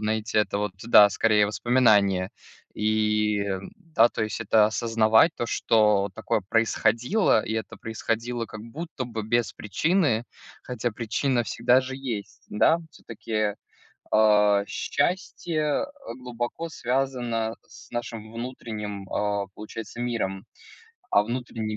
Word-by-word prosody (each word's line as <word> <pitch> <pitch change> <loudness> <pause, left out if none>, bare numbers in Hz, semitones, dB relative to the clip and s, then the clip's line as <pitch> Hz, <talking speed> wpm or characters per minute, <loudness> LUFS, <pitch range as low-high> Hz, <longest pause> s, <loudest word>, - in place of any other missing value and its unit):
знаете, 110 0 -1
это 105 -1 +1
вот, 105 -2 -2
да, 105 -3 +7
скорее, 105 0 +3
воспоминание. 105 -5 +3 0.4
И, 105 -1 +1 0.3
да, 160 - +3
то 110 - -2
есть 110 - -5
это 110 -1 +4
осознавать, 110 +5 +3
то 120 - -2
что 105 -4 +2
такое 110 0 -1
происходило, 115 - +2
и 110 - -4
это 110 0 -4
происходило 115 +1 -3
как 105 - -9
будто 140 +3 -6
бы 115 -2 -5
без 120 +2 0
причины, 125 - +1 0.4
хотя 120 -1 -2
причина 120 +3 -1
всегда 125 +3 +3
же 130 +1 -6
есть, 120 -7 -6
да. 160 +10 +3
Всё-таки, 110 -5 -3 0.6
а, 105 -2 +4
счастье, 175 - -2 0.2
э, 285 0 -9
глубоко 125 +6 -4
связано 120 -5 -1
с - - -15
нашим 115 -2 -5
внутренним, 110 -5 -6
а, 100 -1 -1
получается, 110 +2 -8
миром. 105 -6 -2 0.7
А - - +5
внутренний 115 -2 -4
115 Hz, 120 wpm, -25 LUFS, 105-125 Hz, 0.7 s, да